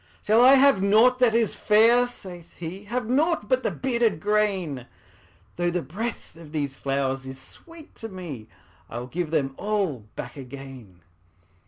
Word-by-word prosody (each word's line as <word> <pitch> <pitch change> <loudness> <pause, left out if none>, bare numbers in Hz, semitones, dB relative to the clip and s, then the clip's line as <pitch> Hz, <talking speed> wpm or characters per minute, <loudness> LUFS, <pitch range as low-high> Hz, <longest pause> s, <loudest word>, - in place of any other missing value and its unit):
``Shall 220 +3 +5
I 265 +2 +8
have 275 -7 +5
nought 225 +6 +4
that 240 -3 +4
is 230 -2 +2
fair?'' 230 +4 +4
saith 180 -8 -11
he; 185 +4 -8
``Have 245 +2 -2
nought 285 0 +1
but 255 +2 +2
the - - 0
bearded 235 -8 0
grain? 195 - -1 0.7
Though 175 0 +1
the 175 0 -2
breath 205 - -6
of 165 -2 -13
these 140 -3 -2
flowers 135 -1 -2
is 130 0 -7
sweet 330 - -13
to 225 - -7
me, 165 - -8 0.4
I 120 - -6
will 120 - -5
give 165 +5 -4
them 135 -4 0
all 190 - -2
back 120 +3 -7
again.'' 130 -8 -11
190 Hz, 165 wpm, -25 LUFS, 140-235 Hz, 0.7 s, I